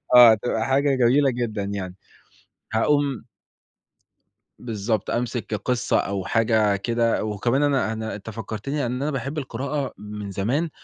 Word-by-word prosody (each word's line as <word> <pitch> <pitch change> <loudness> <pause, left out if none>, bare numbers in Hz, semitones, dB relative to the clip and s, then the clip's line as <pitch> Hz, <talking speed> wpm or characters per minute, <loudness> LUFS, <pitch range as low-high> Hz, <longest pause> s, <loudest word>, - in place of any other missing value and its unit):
آه 120 -2 +10
هتبقى 110 +1 0
حاجة 135 +2 +2
جميلة 130 +3 +4
جدًا 120 -4 -2
يعني. 100 -2 -4 0.8
هاقوم 140 +3 +1 1.3
بالضبط، 110 -2 -2
أمسِك 120 -1 -2
قِصّة 120 +4 0
أو 100 -1 -2
حاجة 110 -2 +2
كده، 115 +2 0
وكمان 120 +6 0
أنا 140 -6 +2
أنا 110 0 -4
أنت 105 +2 -8
فكّرتني 115 +5 -4
إن 125 +2 -3
أنا 150 - 0
باحب 135 +2 -4
القراءة 140 0 -3
من 105 -1 -7
زمان، 125 - -1
115 Hz, 135 wpm, -24 LUFS, 105-135 Hz, 1.3 s, آه